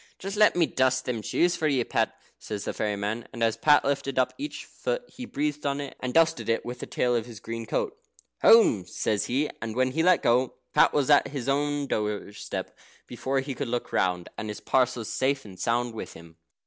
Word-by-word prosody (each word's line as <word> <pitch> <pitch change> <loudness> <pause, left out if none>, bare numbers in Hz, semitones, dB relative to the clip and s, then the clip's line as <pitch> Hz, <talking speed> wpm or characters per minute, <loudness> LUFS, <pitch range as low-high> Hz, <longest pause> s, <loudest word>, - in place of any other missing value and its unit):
"Just 195 +2 -5
let 210 0 +5
me 175 -2 +4
dust 130 -2 +1
them 120 -3 -2
shoes 175 +10 +1
for 155 - 0
ye, 135 -4 +2
Pat," - - -1 0.2
says 105 -2 -5
the - - -2
fairy 105 -1 -1
man. 105 +4 -3
And 115 - -3
as 115 -1 +2
Pat 150 -1 +4
lifted 140 -1 -1
up 130 - +2
each 295 +2 -6
foot - - -3
he 255 - -9
breathed 150 0 -2
on 140 0 -1
it, 140 -1 -6
and 125 - -3
dusted 165 -2 +2
it 115 - +1
with 125 0 -6
the - - -6
tail 125 -1 +1
of 115 0 -1
his 115 -4 -10
green 115 +1 -6
coat. 420 - -1 0.5
"Home!" 115 - +6
says 105 +1 -1
he, 140 +5 0
and 110 -1 -4
when 130 0 +2
he 160 - 0
let 180 +1 +4
go, 125 +2 +2 0.2
Pat - - +5
was 145 -1 +1
at 145 - +6
his 140 -3 -5
own 145 +1 0
doorstep 105 -3 -4 0.3
before 130 +2 -2
he 135 +1 -5
could 140 +1 -4
look 120 +1 -3
round, 90 -1 +1
and 110 - -4
his 105 - -5
parcels 125 -3 +1
safe 135 0 0
and 95 -3 -12
sound 120 0 0
with 110 - -7
him. 85 0 -14
130 Hz, 220 wpm, -27 LUFS, 115-145 Hz, 0.5 s, Home